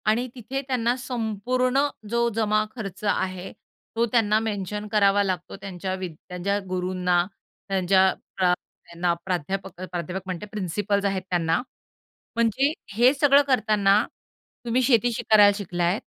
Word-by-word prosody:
आणि 225 +4 +2
तिथे 260 +3 -4
त्यांना 245 -2 +1
संपूर्ण 250 +1 -1 0.3
जो 235 +1 +2
जमा-खर्च 215 -2 -1
आहे, 185 0 -3 0.4
तो 230 +1 +3
त्यांना 215 -3 +3
मेन्शन 210 -1 -3
करावा 205 -1 +4
लागतो, 185 -3 -3
त्यांच्या 190 -1 -4
वी 185 -1 -4 0.2
त्यांच्या 190 +3 -1
गुरूंना 180 -1 +1 0.4
त्यांच्या 190 0 +4
अ, 185 -1 -1 0.3
त्यांना 170 0 -1
प्राध्यापक, 190 +1 -3
प्राध्यापक 180 +2 -4
म्हणते, 185 +1 -5
प्रिन्सिपल्स 200 +1 -1
आहेत 195 -1 0
त्यांना. 165 +1 +1 0.7
म्हणजे 235 +5 +2 0.2
हे 240 +5 +5
सगळं 280 0 +5
करताना, 215 -4 +3 0.6
तुम्ही 240 +2 +1
शेती 240 -1 +3 0.2
करायला 205 -2 +8
शिकला 175 -4 -3
आहेत, 175 +5 +1
205 Hz, 125 wpm, -25 LUFS, 185-230 Hz, 0.7 s, करायला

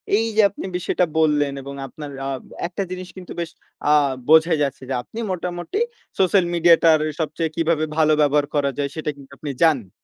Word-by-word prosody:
এইযে 220 0 +2
আপনি 200 - -8
বিষয়টা 180 0 +1
বললেন 150 -3 +2
এবং 140 +1 -8
আপনার 145 +1 -9 0.2
আব 135 -2 -4 0.3
একটা 180 +3 -3
জিনিস 185 0 -5
কিন্তু 180 - -10
বেশ 170 -2 -3 0.4
আ - - +4 0.4
বোঝাই 160 +1 +5
যাচ্ছে 140 -1 -3
যে, - - -1
আপনি 225 - -9
মোটামুটি 180 - -3 0.4
সোশ্যাল 190 -1 +4
মিডিয়াটার 165 -2 +5 0.2
সবচেয়ে 160 +1 -1
কিভাবে 165 -1 +1
ভালো 155 -1 +4
ব্যবহার 145 0 +3
করা 140 -1 +2
যায় 140 -1 -1
সেটা 155 -1 -3
কিন্তু 140 0 -15
আপনি 145 - -5
জানেন। 135 - +3
160 Hz, 175 wpm, -22 LUFS, 145-175 Hz, 0.4 s, বোঝাই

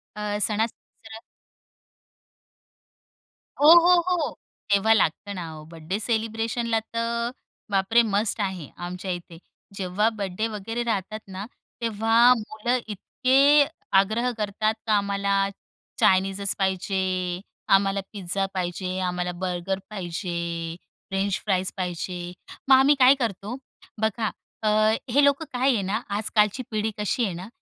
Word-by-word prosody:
अ, 210 -1 -2
सणासुदी 220 +1 -4
जरा 220 0 -9 2.4
हो, 295 +2 +7
हो, 350 +1 +5
हो. 340 -7 0 0.4
तेव्हा 200 +2 +5
लागतं 200 0 0
ना 170 -3 -6
ओ, - - -11
बड्डे 165 +4 -4
सेलिब्रेशनला 225 +1 -1
तर 230 +1 -2 0.4
बापरे! 195 +4 +4
मस्ट 210 0 0
आहे, 190 -6 -3
आमच्या 180 +2 -5
इथे. 175 -1 -7 0.4
जेव्हा 195 +3 +1
बड्डे 200 +2 -2
वगैरे 225 +2 -4
राहतात 215 -2 -2
ना, 190 +1 -6 0.4
तेव्हा 230 +2 +4
मुलं 220 +3 -2
इतके 270 +7 +3 0.3
आग्रह 220 +5 +1
करतात, 215 +1 0
का 215 - +3
"आम्हाला 200 0 -1 0.7
चायनीजच 195 +1 +2
पाहिजे, 190 -2 -1 0.3
आम्हाला 195 0 +3
पिझ्झा 195 -1 -2
पाहिजे, 185 0 -3
आम्हाला 180 0 -2
बर्गर 185 +1 -2
पाहिजे, 180 -3 -4 0.7
फ्रेंच 195 +1 0
फ्राईज 190 -2 0
पाहिजे." 180 -1 -4 0.4
मग 265 - +9
आम्ही 270 +3 +5
काय 260 +1 +7
करतो, 225 -3 -3 0.5
बघा 220 0 0 0.3
अ, - - +1 0.4
हे 280 +4 +4
लोकं 280 +3 +3
काय 255 +2 +3
आहे 220 - 0
ना, 195 +2 -2 0.2
आजकालची 210 +3 +1
पिढी 215 0 -1
कशी 210 +4 0
आहे 195 - -3
ना, 180 +3 -7
205 Hz, 125 wpm, -25 LUFS, 190-230 Hz, 2.4 s, मग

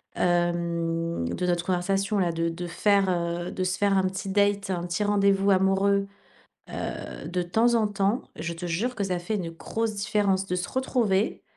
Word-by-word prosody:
hem, 170 - 0
de 135 - -2
notre 175 -1 0
conversation, 195 +3 0
là, 175 -3 +2
de 165 0 0
de 175 +2 -5
faire, 200 +3 +3
heu, 175 0 -1
de 185 - -2
se 185 0 -1
faire 200 -1 +2
un 190 - +3
petit 190 +1 -3
date, 200 0 +2
un 175 -2 -1
petit 180 +4 -1
rendez-vous 200 -1 +3
amoureux, 195 +1 +3 0.7
heu, - - -5
de 180 0 -1
temps 225 +7 +2
en 225 -2 +3
temps, 205 +5 0
je 170 0 -4
te 170 +2 -8
jure 205 +10 -1
que 200 - -1
ça 185 -2 -1
fait 210 +5 -3
une 175 -4 -3
grosse 220 +6 -3
différence 200 -1 +1
de 180 - -2
se 180 - -3
retrouver, 230 -6 0
190 Hz, 185 wpm, -26 LUFS, 175-200 Hz, 0.7 s, faire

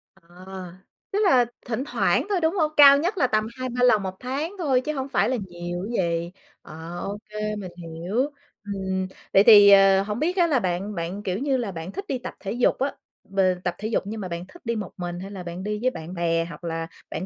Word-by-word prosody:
À, 180 -3 -27 0.9
tức 405 - 0
là 255 -10 +5 0.2
thỉnh 240 +2 -2
thoảng - - +1
thôi, 385 -3 +1
đúng 320 +2 +2
hông? 310 -4 +1
Cao 280 -1 +9
nhất 355 +7 -1
là 260 -7 +3
tầm 215 -1 +1
2-3 250 -1 -2
lần 220 -5 +5
1 190 -1 -4
tháng 280 +8 -3
thôi 275 -7 +2
chứ 305 +4 -3
hổng 265 -1 -3
phải 255 - +2
là 260 - 0
nhiều 175 0 -5
chứ 235 - -4
gì? 170 -1 -1 0.3
Ờ, 165 +3 -8
ô 200 +3 -4
kê, 215 0 -3
mình 190 -4 -6
hiểu. 165 +4 -6 0.5
Ừm, 190 -2 -3 0.3
vậy 195 - +7
thì, 205 -3 +9
ờ, 195 -1 +7
hổng 210 +2 -4
biết 350 +6 0
á 350 -2 +4
là 280 -6 +2
bạn 190 +2 -2
bạn, 175 +4 -4
kiểu 185 +2 -2
như 275 -1 +1
là, 225 -5 -3
bạn 165 +2 -7
thích 395 - -6
đi 265 - -1
tập 245 - -7
thể 195 - -5
dục 245 +3 +1
á, 275 +1 -1 0.3
b 195 0 -6 0.2
tập 175 -1 -1
thể 215 - -4
dục 220 - 0
nhưng 215 +1 -5
mà 185 - -4
bạn 170 0 -5
thích 350 - -16
đi 235 0 -1
một 210 -4 -5
mình 175 -1 -4
hay 195 +2 -7
là 190 -3 -7
bạn 175 +2 -6
đi 210 +1 -2
với 255 - +3
bạn 165 -1 -8
bè 165 -1 0
hoặc 165 0 -10
là 165 -1 -3 0.2
bạn - - -4
205 Hz, 245 wpm, -24 LUFS, 175-255 Hz, 0.9 s, Cao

